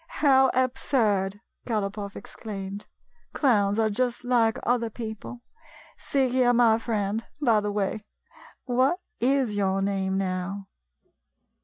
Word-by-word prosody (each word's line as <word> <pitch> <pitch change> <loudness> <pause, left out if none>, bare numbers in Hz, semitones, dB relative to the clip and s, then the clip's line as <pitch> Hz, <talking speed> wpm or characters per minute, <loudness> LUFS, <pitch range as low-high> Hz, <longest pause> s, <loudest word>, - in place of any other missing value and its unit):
" - - -34 0.2
How 265 -2 +6
absurd! 215 -6 +1
" - - -25
Galopoff 205 -3 -3
exclaimed. 200 -1 -7 0.2
" - - -40
Clowns 205 -7 +2
are 220 -1 +2
just 245 +3 -1
like 235 -3 +2
other 235 -1 +1
people. 225 +2 -7 0.5
See 270 -2 0
here, 245 -1 +3
my 230 -2 +4
friend 220 -1 -2
— - - -43
by 235 -7 +3
the 210 0 -2
way, 205 +1 -1 0.6
what 260 +7 +2 0.2
is 255 -3 +1
your 195 -1 +1
name 195 -1 -1
now?" 195 +1 -3
220 Hz, 135 wpm, -26 LUFS, 200-245 Hz, 0.6 s, How